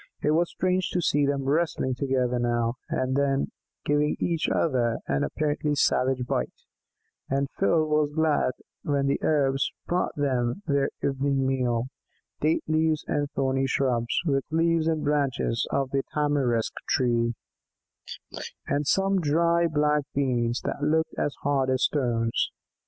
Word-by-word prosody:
It 150 Hz, -, +3 dB
was 170 Hz, +2 st, +2 dB
strange 185 Hz, 0 st, 0 dB
to 180 Hz, -, +1 dB
see 145 Hz, -2 st, +2 dB
them 140 Hz, -1 st, 0 dB
wrestling 145 Hz, -2 st, 0 dB
together, 125 Hz, -2 st, 0 dB
now 120 Hz, -1 st, 0 dB, 0.2 s
and 130 Hz, 0 st, -1 dB
then 140 Hz, -1 st, +1 dB, 0.3 s
giving 145 Hz, +1 st, +1 dB
each 165 Hz, -2 st, 0 dB
other 120 Hz, -7 st, +1 dB
an 70 Hz, 0 st, 0 dB
apparently 150 Hz, -, -1 dB
savage 130 Hz, -2 st, +2 dB
bite, -, -, -3 dB, 0.7 s
and 140 Hz, +1 st, 0 dB
Phil 160 Hz, -2 st, +3 dB
was 150 Hz, -1 st, +1 dB
glad 155 Hz, -5 st, +2 dB, 0.3 s
when 140 Hz, -2 st, 0 dB
the 140 Hz, -, 0 dB
Arabs 135 Hz, -3 st, +1 dB
brought 180 Hz, +1 st, -1 dB
them 130 Hz, +3 st, -1 dB
their 140 Hz, -2 st, +1 dB
evening 135 Hz, 0 st, 0 dB
meal 125 Hz, -2 st, 0 dB, 0.5 s
date 155 Hz, +2 st, +1 dB
leaves 155 Hz, 0 st, +1 dB
and 145 Hz, -1 st, -1 dB
thorny 135 Hz, 0 st, +1 dB
shrubs, 125 Hz, -3 st, 0 dB
with 135 Hz, -4 st, +1 dB
leaves 165 Hz, 0 st, +2 dB
and 160 Hz, -2 st, 0 dB
branches 140 Hz, -5 st, 0 dB
of 135 Hz, -1 st, -1 dB
the 135 Hz, -, +1 dB
tamarisk 140 Hz, -6 st, +1 dB
tree, 120 Hz, -2 st, +1 dB, 1.3 s
and 145 Hz, 0 st, -1 dB
some 195 Hz, +2 st, +2 dB
dry 170 Hz, +2 st, +2 dB
black 150 Hz, -1 st, +2 dB
beans 120 Hz, -3 st, 0 dB
that -, -, -4 dB
looked 160 Hz, +2 st, +1 dB
as 145 Hz, -, -1 dB
hard 135 Hz, -2 st, +1 dB
as 130 Hz, -1 st, +1 dB
stones. 120 Hz, -5 st, +1 dB
140 Hz, 140 wpm, -26 LUFS, 130-155 Hz, 1.3 s, It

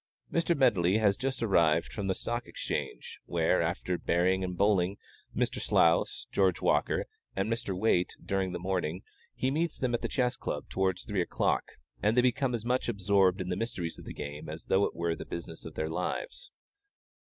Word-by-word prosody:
Mr. 170 Hz, 0 st, +2 dB
Medley 100 Hz, -8 st, +4 dB
has 105 Hz, -3 st, +3 dB
just 130 Hz, +1 st, -2 dB
arrived 85 Hz, -6 st, +3 dB
from 100 Hz, -2 st, -3 dB
the 95 Hz, -, +1 dB
Stock 120 Hz, +1 st, -3 dB
Exchange, -, -, -4 dB
where, 85 Hz, +1 st, +2 dB
after 85 Hz, +1 st, -1 dB
"Bearing" 95 Hz, +2 st, +2 dB
or -, -, -1 dB
"Bulling" 95 Hz, +1 st, +2 dB, 0.4 s
Mr. -, -, 0 dB
Slous, 85 Hz, 0 st, +3 dB
George 95 Hz, -3 st, +2 dB
Walker, -, -, +2 dB, 0.3 s
and 95 Hz, +4 st, 0 dB
Mr. 115 Hz, -5 st, -3 dB
Waite 90 Hz, -3 st, +2 dB
during 95 Hz, -1 st, 0 dB
the 90 Hz, -, -3 dB
morning, 90 Hz, -1 st, -2 dB, 0.3 s
he 130 Hz, -, 0 dB
meets 160 Hz, +3 st, 0 dB
them 125 Hz, -2 st, -1 dB
at 120 Hz, -, 0 dB
the -, -, -1 dB
Chess 125 Hz, -2 st, 0 dB
Club -, -, -4 dB
towards 95 Hz, -2 st, 0 dB
three 100 Hz, -3 st, 0 dB
o'clock, 85 Hz, -, 0 dB, 0.3 s
and 110 Hz, +3 st, +2 dB
they -, -, +8 dB
become 125 Hz, 0 st, +1 dB
as 115 Hz, -1 st, -5 dB
much 125 Hz, 0 st, +1 dB
absorbed 100 Hz, -2 st, +3 dB
in 90 Hz, -, -4 dB
the 90 Hz, -, 0 dB
mysteries 90 Hz, -7 st, -3 dB
of -, -, -11 dB
the -, -, -6 dB
game 75 Hz, +1 st, -6 dB
as 80 Hz, +1 st, -6 dB
though 95 Hz, +1 st, +3 dB
it -, -, -4 dB
were 85 Hz, 0 st, 0 dB
the -, -, -7 dB
business 85 Hz, -1 st, -7 dB
of 80 Hz, -, -8 dB
their 80 Hz, -, -1 dB
lives. -, -, -3 dB
95 Hz, 190 wpm, -30 LUFS, 85-115 Hz, 0.4 s, they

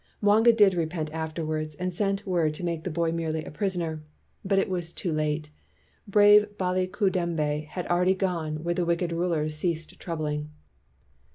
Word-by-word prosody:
Mwanga 215 Hz, +3 st, +5 dB
did 205 Hz, -4 st, +5 dB
repent 160 Hz, -2 st, -2 dB
afterward, 155 Hz, -1 st, -3 dB
and 180 Hz, 0 st, -2 dB
sent 195 Hz, +2 st, -1 dB
word 170 Hz, -5 st, +1 dB
to 180 Hz, -, -7 dB
make 170 Hz, -2 st, -2 dB
the -, -, -1 dB
boy 165 Hz, 0 st, 0 dB
merely 160 Hz, -2 st, -2 dB
a -, -, -8 dB
pris 190 Hz, +3 st, -1 dB
oner. 160 Hz, -2 st, -3 dB, 0.4 s
But 195 Hz, 0 st, +1 dB
it 195 Hz, -, +2 dB
was 175 Hz, -3 st, -3 dB
too 175 Hz, -4 st, -2 dB
late. 150 Hz, 0 st, -1 dB, 0.6 s
Brave 205 Hz, +1 st, +5 dB
Baliku 185 Hz, +1 st, 0 dB
dembe 155 Hz, -4 st, -1 dB
had 180 Hz, +2 st, -5 dB
already 180 Hz, +2 st, +2 dB
gone 165 Hz, -5 st, -2 dB
where 175 Hz, +1 st, 0 dB
wicked 170 Hz, 0 st, 0 dB
rulers 165 Hz, -3 st, -1 dB
cease 165 Hz, -1 st, -1 dB
troubling. 150 Hz, -3 st, -4 dB
170 Hz, 165 wpm, -27 LUFS, 155-185 Hz, 0.6 s, Mwanga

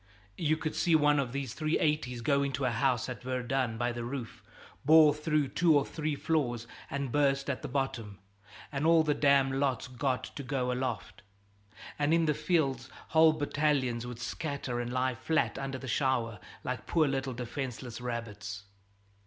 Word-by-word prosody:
You 155 Hz, -1 st, +2 dB
could 155 Hz, -1 st, -3 dB
see 170 Hz, -3 st, +2 dB
one 150 Hz, -1 st, +4 dB
of 130 Hz, -4 st, -1 dB
these 135 Hz, -2 st, -4 dB
380's 150 Hz, -5 st, 0 dB
go 140 Hz, +3 st, +2 dB
into 140 Hz, -1 st, -1 dB
a 125 Hz, -, +2 dB
house 125 Hz, 0 st, +1 dB
at 125 Hz, -2 st, -6 dB
Verdun 125 Hz, -1 st, -1 dB
by 120 Hz, +1 st, 0 dB
the 120 Hz, 0 st, -5 dB
roof, 120 Hz, -1 st, -6 dB, 0.4 s
bore 155 Hz, 0 st, +7 dB
through 150 Hz, -2 st, 0 dB
two 160 Hz, +2 st, +4 dB
or 140 Hz, -, +1 dB
three 155 Hz, -2 st, -3 dB
floors, 130 Hz, -7 st, -1 dB, 0.2 s
and 140 Hz, -2 st, -3 dB
burst 140 Hz, -1 st, +2 dB
at 130 Hz, -, -5 dB
the -, -, -4 dB
bottom, 125 Hz, -7 st, -3 dB, 0.5 s
and 145 Hz, +2 st, 0 dB
all 165 Hz, -1 st, +6 dB
the 150 Hz, -1 st, +2 dB
damn 140 Hz, -2 st, +4 dB
lot's 135 Hz, -4 st, 0 dB
got 130 Hz, +1 st, -1 dB
to -, -, -7 dB
go 130 Hz, -2 st, -1 dB
aloft; 125 Hz, -4 st, -3 dB, 0.8 s
and 150 Hz, +3 st, +3 dB
in 165 Hz, -1 st, +3 dB
the 150 Hz, -, +2 dB
fields 145 Hz, -5 st, 0 dB, 0.2 s
whole 160 Hz, -1 st, +6 dB
battalions 145 Hz, -5 st, 0 dB
would 120 Hz, -1 st, -6 dB
scatter 130 Hz, 0 st, -3 dB
and 120 Hz, 0 st, -3 dB
lie 130 Hz, +1 st, +1 dB
flat 155 Hz, +6 st, 0 dB
under 135 Hz, -1 st, -3 dB
the 130 Hz, -, -8 dB
shower 120 Hz, -4 st, 0 dB, 0.2 s
like 125 Hz, -3 st, -4 dB
poor 160 Hz, -3 st, +3 dB
little 135 Hz, -1 st, -2 dB
defenseless 125 Hz, 0 st, -5 dB
rabbits. 105 Hz, -4 st, -5 dB
135 Hz, 170 wpm, -30 LUFS, 125-150 Hz, 0.8 s, bore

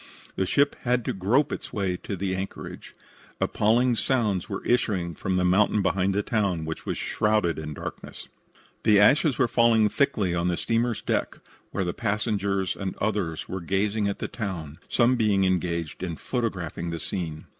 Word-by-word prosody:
The 95 Hz, -, 0 dB
ship 140 Hz, +8 st, +3 dB
had 125 Hz, -1 st, +1 dB
to -, -, -1 dB
grope 120 Hz, +10 st, +2 dB
its -, -, -5 dB
way 95 Hz, -3 st, -1 dB
to 100 Hz, -, -5 dB
the 95 Hz, 0 st, -2 dB
anchorage. 95 Hz, +1 st, -7 dB, 0.4 s
Appalling 120 Hz, +4 st, +2 dB
sounds 110 Hz, -6 st, 0 dB
were 100 Hz, -, -5 dB
issuing 100 Hz, -8 st, +1 dB
from 95 Hz, +4 st, -2 dB
the 90 Hz, 0 st, +2 dB
mountain 100 Hz, +3 st, +3 dB
behind 95 Hz, 0 st, +1 dB
the 105 Hz, -, +1 dB
town, 100 Hz, -8 st, 0 dB
which 80 Hz, 0 st, -6 dB
was -, -, -1 dB
shrouded 105 Hz, -7 st, +1 dB
in 75 Hz, -1 st, -6 dB
darkness. -, -, -8 dB, 0.5 s
The 105 Hz, -2 st, +5 dB
ashes 135 Hz, +6 st, +5 dB
were 130 Hz, -, +3 dB
falling 115 Hz, -3 st, +4 dB
thickly 110 Hz, -11 st, +1 dB
on 85 Hz, 0 st, 0 dB
the 90 Hz, -1 st, 0 dB
steamer's 115 Hz, 0 st, 0 dB
deck, -, -, -1 dB, 0.3 s
where 95 Hz, -, -2 dB
the 90 Hz, -1 st, -2 dB
passengers 100 Hz, -2 st, -1 dB
and 95 Hz, -2 st, -4 dB
others 100 Hz, -7 st, -2 dB
were 95 Hz, 0 st, -4 dB
gazing 100 Hz, +4 st, 0 dB
at 100 Hz, -, -2 dB
the -, -, -3 dB
town, 90 Hz, -8 st, -5 dB
some 125 Hz, +1 st, +3 dB
being 105 Hz, -4 st, +3 dB
engaged 85 Hz, -4 st, -1 dB
in 85 Hz, -3 st, -3 dB
photographing 95 Hz, -, -3 dB
the 85 Hz, 0 st, -4 dB
scene. 80 Hz, -5 st, -4 dB
100 Hz, 175 wpm, -26 LUFS, 90-110 Hz, 0.5 s, The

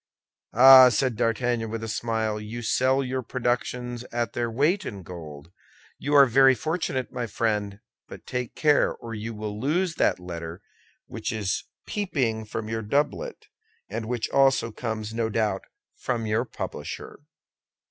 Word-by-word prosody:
"Ah!" 130 Hz, +1 st, +10 dB
said 125 Hz, +1 st, 0 dB
D'Artagnan 115 Hz, +1 st, 0 dB
with 115 Hz, 0 st, -4 dB
a -, -, -3 dB
smile, 110 Hz, -1 st, -1 dB
"you 115 Hz, +3 st, -6 dB
sell 130 Hz, +4 st, +2 dB
your 130 Hz, 0 st, -2 dB
productions 120 Hz, 0 st, -2 dB
at 120 Hz, -1 st, -2 dB
their 120 Hz, -1 st, -1 dB
weight 150 Hz, -, +1 dB
in 100 Hz, -, -7 dB
gold. 80 Hz, -3 st, -10 dB, 0.5 s
You 145 Hz, +1 st, 0 dB
are 140 Hz, -1 st, +9 dB
very 135 Hz, +1 st, +5 dB
fortunate, 155 Hz, -4 st, -2 dB
my 120 Hz, -1 st, -3 dB
friend; 105 Hz, -2 st, -1 dB, 0.3 s
but -, -, -11 dB
take 125 Hz, -2 st, -4 dB
care 150 Hz, -2 st, +3 dB
or 115 Hz, -1 st, -8 dB
you 110 Hz, +1 st, -5 dB
will 105 Hz, 0 st, -5 dB
lose 165 Hz, +8 st, 0 dB
that -, -, +2 dB
letter 85 Hz, -1 st, -7 dB, 0.4 s
which -, -, -4 dB
is 105 Hz, -4 st, -2 dB, 0.2 s
peeping 130 Hz, -, -1 dB
from 110 Hz, 0 st, -5 dB
your 110 Hz, 0 st, -2 dB
doublet, 145 Hz, -, -1 dB, 0.4 s
and 110 Hz, -, -4 dB
which 120 Hz, -2 st, -1 dB
also 135 Hz, -4 st, +3 dB
comes, 110 Hz, -1 st, -4 dB
no 115 Hz, -1 st, -1 dB
doubt, 105 Hz, -3 st, -1 dB, 0.3 s
from 115 Hz, -3 st, -2 dB
your 110 Hz, +3 st, 0 dB
publisher." -, -, -7 dB
115 Hz, 150 wpm, -26 LUFS, 110-130 Hz, 0.5 s, Ah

